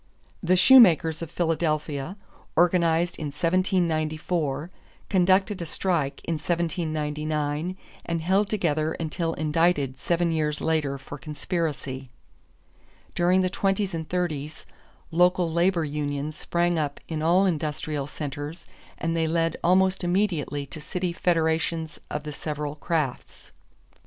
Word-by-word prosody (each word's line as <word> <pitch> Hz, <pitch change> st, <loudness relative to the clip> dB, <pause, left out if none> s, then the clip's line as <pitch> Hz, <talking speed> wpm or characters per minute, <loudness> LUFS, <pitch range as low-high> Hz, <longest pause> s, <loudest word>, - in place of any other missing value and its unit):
The 180 Hz, +2 st, +3 dB
shoemakers 175 Hz, -9 st, +7 dB
of 165 Hz, -, -5 dB
Philadelphia, 155 Hz, -1 st, -1 dB, 0.4 s
organized 170 Hz, 0 st, +3 dB
in 155 Hz, -, -3 dB
1794, 165 Hz, -2 st, 0 dB, 0.4 s
conducted 190 Hz, +1 st, +3 dB
a 170 Hz, -, -4 dB
strike 160 Hz, -5 st, -1 dB
in 165 Hz, -, -1 dB
1799 155 Hz, -1 st, -2 dB, 0.3 s
and 170 Hz, -1 st, -2 dB
held 195 Hz, +4 st, +2 dB
together 160 Hz, -6 st, 0 dB
until 165 Hz, +1 st, -2 dB
indicted 155 Hz, -4 st, +1 dB
seven 170 Hz, +5 st, +1 dB
years 150 Hz, -2 st, 0 dB
later 150 Hz, -4 st, 0 dB
for 135 Hz, +2 st, -9 dB
conspiracy. 150 Hz, -4 st, -3 dB, 1.0 s
During 180 Hz, +2 st, +3 dB
the 185 Hz, -, +1 dB
twenties 195 Hz, 0 st, 0 dB
and 160 Hz, -1 st, -4 dB
thirties, 160 Hz, -4 st, -3 dB, 0.5 s
local 175 Hz, 0 st, +3 dB
labor 170 Hz, -1 st, +2 dB
unions 145 Hz, 0 st, -3 dB
sprang 175 Hz, 0 st, 0 dB
up 145 Hz, -2 st, -2 dB
in 160 Hz, -2 st, -3 dB
all 175 Hz, +5 st, +4 dB
industrial 150 Hz, -4 st, -2 dB
centers 145 Hz, +3 st, -6 dB, 0.3 s
and 165 Hz, 0 st, -1 dB
they 165 Hz, -1 st, +1 dB
led 165 Hz, 0 st, +1 dB
almost 185 Hz, +2 st, +3 dB
immediately 175 Hz, -6 st, 0 dB
to 155 Hz, +2 st, -9 dB
city 180 Hz, +3 st, -3 dB
federations 165 Hz, -1 st, 0 dB
of 150 Hz, -, -3 dB
the 150 Hz, -1 st, -6 dB
several 150 Hz, 0 st, -4 dB
crafts. 150 Hz, -4 st, -3 dB
165 Hz, 120 wpm, -26 LUFS, 150-175 Hz, 1.0 s, shoemakers